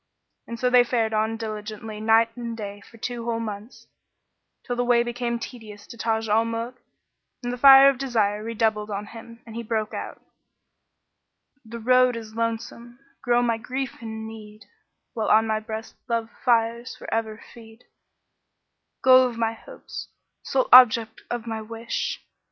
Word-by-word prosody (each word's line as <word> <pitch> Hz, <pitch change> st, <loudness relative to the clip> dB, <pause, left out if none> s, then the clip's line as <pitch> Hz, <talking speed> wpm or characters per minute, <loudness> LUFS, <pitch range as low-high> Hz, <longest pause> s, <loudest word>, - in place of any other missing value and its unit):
And 235 Hz, 0 st, -7 dB
so 250 Hz, 0 st, +1 dB
they 250 Hz, -1 st, +7 dB
fared 230 Hz, -2 st, 0 dB
on 220 Hz, +1 st, 0 dB
diligently 215 Hz, -1 st, -6 dB
night 225 Hz, +1 st, +3 dB
and 235 Hz, -2 st, -6 dB
day 205 Hz, -1 st, -7 dB
for 230 Hz, -, -16 dB
two 235 Hz, +1 st, -5 dB
whole 230 Hz, -1 st, -1 dB
months, 215 Hz, +1 st, -7 dB, 0.8 s
till 245 Hz, -, -2 dB
the 245 Hz, -, 0 dB
way 240 Hz, -1 st, +3 dB
became 240 Hz, 0 st, -3 dB
tedious 215 Hz, -4 st, -10 dB
to -, -, -11 dB
Taj 225 Hz, -1 st, -1 dB
al 215 Hz, +2 st, +3 dB
Muluk 230 Hz, +2 st, -5 dB, 0.6 s
and 245 Hz, 0 st, -2 dB
the -, -, -5 dB
fire 270 Hz, +1 st, +9 dB
of 275 Hz, -2 st, +2 dB
desire 215 Hz, -6 st, 0 dB
redoubled 220 Hz, -2 st, -1 dB
on 205 Hz, 0 st, -4 dB
him; 230 Hz, +2 st, -12 dB
and 225 Hz, -1 st, -11 dB
he 235 Hz, -, -3 dB
broke 220 Hz, -2 st, -2 dB
out, -, -, -6 dB, 1.4 s
"The 230 Hz, +1 st, -8 dB
road 250 Hz, +1 st, +3 dB
is 220 Hz, -1 st, -8 dB
lonesome; 230 Hz, +1 st, -4 dB, 0.2 s
grow 240 Hz, 0 st, +2 dB
my 230 Hz, -2 st, 0 dB
grief 260 Hz, +1 st, -5 dB
and 220 Hz, -1 st, -6 dB
need, 215 Hz, -1 st, -12 dB, 0.2 s
* -, -, -54 dB
While 220 Hz, -2 st, -2 dB
on 220 Hz, +1 st, +5 dB
my 220 Hz, -1 st, 0 dB
breast 220 Hz, 0 st, -7 dB, 0.2 s
love 230 Hz, -1 st, -1 dB
fires 235 Hz, +1 st, +1 dB
for -, -, -11 dB
ever 220 Hz, -1 st, -2 dB
feed: 225 Hz, 0 st, -15 dB, 1.2 s
Goal 255 Hz, 0 st, +7 dB
of 235 Hz, -, -9 dB
my 225 Hz, -1 st, 0 dB
hopes, -, -, -10 dB, 0.3 s
sole 260 Hz, -1 st, 0 dB
object 230 Hz, -3 st, +7 dB
of 240 Hz, -2 st, -4 dB
my 225 Hz, -1 st, -4 dB
wish! 230 Hz, +1 st, -4 dB
230 Hz, 165 wpm, -24 LUFS, 220-240 Hz, 1.4 s, fire